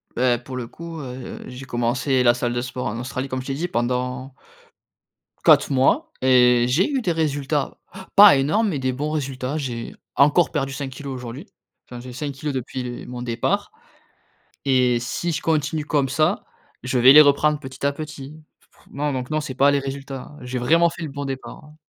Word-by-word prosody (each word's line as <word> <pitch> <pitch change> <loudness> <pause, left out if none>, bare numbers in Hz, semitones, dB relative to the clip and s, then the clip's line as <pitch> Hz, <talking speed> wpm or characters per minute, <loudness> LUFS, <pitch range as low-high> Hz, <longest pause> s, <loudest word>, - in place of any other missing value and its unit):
Bah, 125 -1 +2
pour 130 +1 -9
le 120 - -4
coup, 165 +2 -9
heu 125 -1 -7
heu, - - -10
j'ai 130 +1 -9
commencé 125 +2 0
la 120 - +6
salle 120 -1 -2
de 120 - -1
sport 125 0 -4
en 115 +3 -4
Australie 130 +2 -4
comme 130 -1 -3
je - - -10
t'ai 135 - -2
dit 170 +6 -2
pendant 125 +1 -2 1.1
4 - - +5
mois 230 - +2
et 125 -2 +5
j'ai 160 +11 +2
eu 275 -3 0
des 180 - 0
résultats, 145 -2 -1 0.4
pas 200 -6 +9
énormes 160 +11 +1
mais 145 -6 -2
des 130 0 0
bons 145 +4 -3
résultats. 135 -1 -3
J'ai 120 -5 -5 0.2
encore 150 +5 +4
perdu 135 -3 -2
5 140 -1 -4
kilos 135 +1 -7
aujourd'hui. 125 +2 -7 0.4
Enfin, 120 -1 -9
j'ai 125 - -9
5 145 +3 -4
kilos 145 +1 -4
depuis 130 0 -4
les 120 -1 -6
mon 125 0 -7
départ 120 -1 -1 0.9
et 125 -3 +3
si 165 +8 -2
je - - -3
continue 155 -1 0
comme 145 -3 +1
ça, 155 +7 +1 0.4
je 125 0 -1
vais 130 +2 +8
les 150 - +10
reprendre 150 +1 +4
petit 130 -1 -8
à 140 - +2
petit. 150 0 -9 0.3
Fr - - -25
non, 145 +1 -2
donc 125 0 -4
non, 155 0 0
c'est 140 -4 -6
pas 140 +2 +4
les 140 - +2
résultats. 135 0 -7
J'ai 125 0 -4
vraiment 165 +8 +4
fait 170 +1 -8
le 155 - -4
bon 140 +1 -5
départ, 135 +3 -7
hein. 150 +1 -17
135 Hz, 205 wpm, -22 LUFS, 125-150 Hz, 1.1 s, les